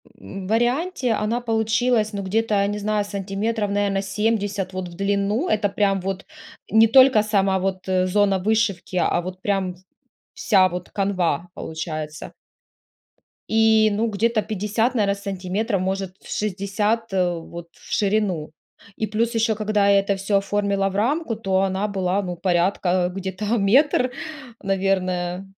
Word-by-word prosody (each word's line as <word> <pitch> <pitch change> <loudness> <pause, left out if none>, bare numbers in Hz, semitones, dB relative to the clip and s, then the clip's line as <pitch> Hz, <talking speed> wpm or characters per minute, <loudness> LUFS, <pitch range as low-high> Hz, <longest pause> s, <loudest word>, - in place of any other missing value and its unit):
в - - -26
м, 185 - -7
варианте 245 - +1
она 220 +3 -1
получилась, 225 -1 +1
ну 200 -1 -3
где-то 215 +3 0
я 200 0 +2
не 205 0 -3
знаю 210 0 0
сантиметров, 205 +2 -2
наверное, 200 -1 0
70 200 -1 -1
вот 185 -1 -4
в 170 - -11
длину. 200 - 0
Это 205 -1 +1
прям 195 -1 +1
вот 195 0 -4 0.5
не 225 +1 +6
только 260 -2 +6
сама 195 -3 +1
вот, 190 0 -3
э, 185 0 +1
зона 195 0 +2
вышивки, 205 -3 0
а 175 -1 +2
вот 185 +1 -8
прям 190 -2 -1 0.6
вся 195 -6 +3
вот 180 0 -6
канва 180 -5 -1
получается. 155 -1 -6 1.2
И, 220 -1 +4
ну, 220 +3 0
где-то 220 +2 +1
50, 215 +4 -1
наверное, 200 -3 +2
сантиметров, 195 +1 -2
может 190 0 -3
60, 210 +3 -2
э, 180 -2 +1
вот 170 +1 -9
в - - -16
ширину. 195 -7 0 0.4
И 220 - -2
плюс 230 +2 -1
ещё, 225 -1 +2
когда 210 -1 +1
я 200 0 +6
это 200 0 0
всё 195 +1 0
оформила 200 0 0
в 195 - -8
рамку, 250 +3 0
то 190 -3 0
она 195 +2 0
была, 190 0 0
ну, 180 -2 -4
порядка 180 0 +1
где-то 190 +2 -4
метр, 255 +5 +3 0.5
наверное. 185 -1 -1
200 Hz, 150 wpm, -22 LUFS, 190-215 Hz, 1.2 s, не